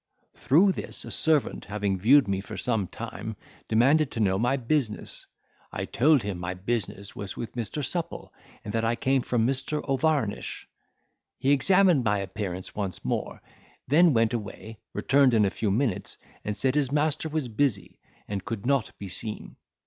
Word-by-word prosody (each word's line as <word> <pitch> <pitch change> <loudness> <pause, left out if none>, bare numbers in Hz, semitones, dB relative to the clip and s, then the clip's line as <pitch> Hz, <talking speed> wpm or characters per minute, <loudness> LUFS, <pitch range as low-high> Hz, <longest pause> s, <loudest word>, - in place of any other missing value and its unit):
Through 180 +8 +4
this - - -2
a - - -7
servant 155 -3 +2
having 100 -2 -2
viewed 130 +6 +5
me 95 -1 -1
for 95 - -8
some 110 -6 0
time, 110 +6 -7 0.3
demanded 135 +7 +4
to - - -5
know 95 -3 +2
my 125 +4 +2
business. 125 -3 -2 0.4
I - - -3
told 145 +1 +3
him 100 -3 -4
my 90 +1 -4
business 100 0 -3
was 100 -2 -6
with 115 -3 -5
Mr. 125 +5 -3
Supple, 170 +3 -3 0.3
and 105 - -5
that 115 - 0
I 115 +1 +1
came 130 +2 +1
from 120 -2 0
Mr. 135 +4 -1
O'Varnish. 135 -5 -1 0.7
He 135 - +1
examined 180 0 +4
my 105 -2 +2
appearance 95 -2 -5
once 100 -4 -4
more, - - -3 0.4
then 165 +5 +5
went 115 -3 +2
away, 110 0 -6
returned 135 -3 +3
in 105 -2 +4
a 95 - +1
few 110 - -1
minutes, 110 -1 -1 0.3
and 105 -1 -3
said 130 +5 +1
his 140 -3 +1
master 150 +1 0
was 155 -4 -2
busy, 115 -4 -1 0.3
and 100 -2 -4
could 110 0 -5
not 135 -3 0
be 100 - -7
seen. 105 +4 -6
115 Hz, 170 wpm, -27 LUFS, 105-140 Hz, 0.7 s, viewed